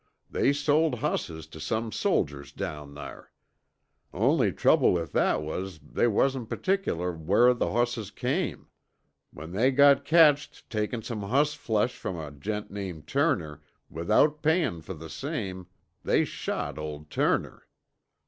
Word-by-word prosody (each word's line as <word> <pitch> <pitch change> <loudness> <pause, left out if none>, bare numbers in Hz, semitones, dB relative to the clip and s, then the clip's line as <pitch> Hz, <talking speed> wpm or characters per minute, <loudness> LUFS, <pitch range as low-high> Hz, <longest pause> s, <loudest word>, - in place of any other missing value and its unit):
They - - +2
sold 145 +1 +2
hosses 85 - -3
tuh 80 0 -12
some 110 +8 -2
soldiers 70 -6 -1
down 75 -2 -6
thar. 75 - -10 0.8
Only - - +2
trouble - - +4
with 85 -2 -2
that 75 - +2
was 90 +3 -5
that - - -21
they - - +3
wasn't 125 +2 +1
pertickler 90 - -1
whar 100 +10 +4
from 125 -1 +1
the - - +1
hosses 120 -4 0
came. 140 - -2 0.6
When 80 +2 -10
they 110 +8 +3
got 140 +1 +5
catched 150 -1 +4
takin' 110 +1 -2
some 110 -3 -4
hossflesh 125 -1 +1
from 95 - -5
a 75 -3 -6
gent 105 +9 -5
named 95 -6 -6
Turner, 75 -2 0 0.3
without 145 - +2
payin' 160 - +1
fer 90 +4 -7
the 80 +1 -9
same, 95 - -5 0.4
they - - +2
shot - - -4
old 75 -1 -7
Turner." - - 0
105 Hz, 140 wpm, -27 LUFS, -, 0.8 s, got